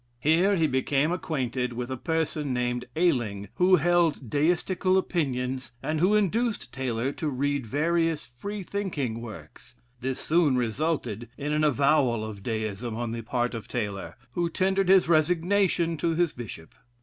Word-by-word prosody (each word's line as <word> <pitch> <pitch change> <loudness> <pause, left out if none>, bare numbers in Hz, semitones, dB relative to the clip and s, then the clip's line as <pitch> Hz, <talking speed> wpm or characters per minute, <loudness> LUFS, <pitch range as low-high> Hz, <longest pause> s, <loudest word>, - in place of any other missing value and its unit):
Here 170 +8 +3
he 165 -3 +2
became 140 +2 +1
acquainted 130 -8 -2
with 125 +2 -4
a - - -1
person 155 0 -1
named 125 0 -1
Ayling 120 - +1
who 185 +1 +6
held 165 -6 +2
Deistical 180 +5 +2
opinions, 130 -8 -1
and 155 0 -1
who 190 +6 +4
induced 215 - 0
Taylor 130 0 -1
to 155 +1 -3
read 140 -1 -1
various 165 +4 +1
Free 195 - -6
thinking 150 - -3
works; 110 -4 -11 0.2
this 130 +1 -3
soon 155 -5 +2
resulted 120 -2 -1
in 145 +1 -2
an 150 0 +1
avowal 140 -5 +3
of 105 -2 -7
Deism 110 +1 -3
on 120 0 -3
the 115 0 -4
part 120 +2 -1
of 115 -2 -6
Taylor, 105 -5 -4 0.2
who 175 -1 -1
tendered 190 +2 +1
his 190 -3 +6
resignation 170 +1 +2
to 165 +2 0
his 170 -2 +1
Bishop. 100 -9 -9
145 Hz, 150 wpm, -27 LUFS, 120-170 Hz, 0.2 s, who